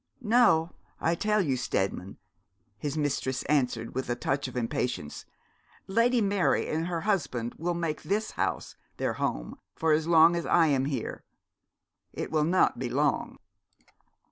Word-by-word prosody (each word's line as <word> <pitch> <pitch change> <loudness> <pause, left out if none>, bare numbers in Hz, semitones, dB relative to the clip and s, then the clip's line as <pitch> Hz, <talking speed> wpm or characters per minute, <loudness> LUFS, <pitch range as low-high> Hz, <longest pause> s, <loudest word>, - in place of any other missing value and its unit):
'No, 220 - +3 0.3
I 165 - +1
tell 210 +4 +1
you, 140 -8 0
Steadman,' 95 -5 -2 0.6
his 145 +1 -3
mistress 135 -3 -1
answered, 125 -6 0
with 130 -1 -3
a 120 - +1
touch 135 +3 -1
of 130 - -7
impatience; 115 -9 -3 0.6
'Lady 230 +4 +2
Mary 200 -2 +1
and 160 +2 -1
her 170 -2 -2
husband 135 - -1
will 175 +2 -1
make 165 -3 -2
this 210 +3 -1
house - - -3 0.2
their - - -1
home - - -3 0.2
so - - -5
long 160 +2 +5
as 170 - -2
I 170 - +5
am 135 -4 +2
here. 135 -5 -4 0.9
It - - -5
will 155 -1 +2
not 180 +3 +2
be - - -2
long.' - - 0
160 Hz, 145 wpm, -28 LUFS, 130-175 Hz, 0.9 s, long